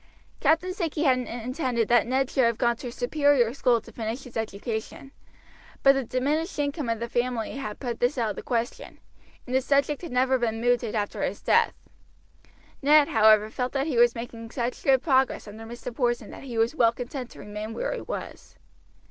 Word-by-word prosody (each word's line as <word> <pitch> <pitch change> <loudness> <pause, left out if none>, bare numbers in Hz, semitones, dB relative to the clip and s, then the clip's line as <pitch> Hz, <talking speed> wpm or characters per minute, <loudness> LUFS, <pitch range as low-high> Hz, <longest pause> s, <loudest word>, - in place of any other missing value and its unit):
Captain 325 +5 +2
Sankey 330 -4 -2
had 260 -4 +4
intended 245 0 -2
that 240 -1 +4
Ned 265 +1 0
should 260 - +3
have 230 -1 +1
gone 235 -1 +2
to 250 - -7
a - - -5
superior 260 -2 +2
school 250 -3 +2
to - - -14
finish 230 +3 -4
his 250 - -13
education, 220 +4 -4 0.7
but 275 - +8
the 270 -1 -1
diminished 290 - -1
income 285 -2 -2
of 230 -1 -1
the 235 - -3
family 240 +1 -2
had 215 -6 -5
put 240 -4 -4
this 245 +4 +1
out 225 -3 0
of - - -7
the - - -6
question, 235 -1 -3 0.5
and 250 - -6
the 260 - +3
subject 280 +2 +1
had 340 - -7
never 260 +1 +2
been 225 -2 -1
mooted 240 -1 +1
after 205 -1 -2
his - - -2
death. - - +3 1.1
Ned, 295 +1 +5
however, 215 -1 +5
felt 250 +1 -3
that 275 0 0
he 295 -6 -2
was 240 0 +5
making 230 -1 -7
such 240 +1 -3
good 265 -1 +4
progress 265 -6 +2
under 215 +2 -9
Mr. 240 +1 -7
Porson 240 -4 -1
that - - -10
he 240 -3 -5
was 225 +4 +2
well 230 -6 +4
content 250 +1 -6
to - - -15
remain 210 +2 -6
where - - -2
he - - -5
was. - - -7
245 Hz, 200 wpm, -26 LUFS, 230-270 Hz, 1.1 s, but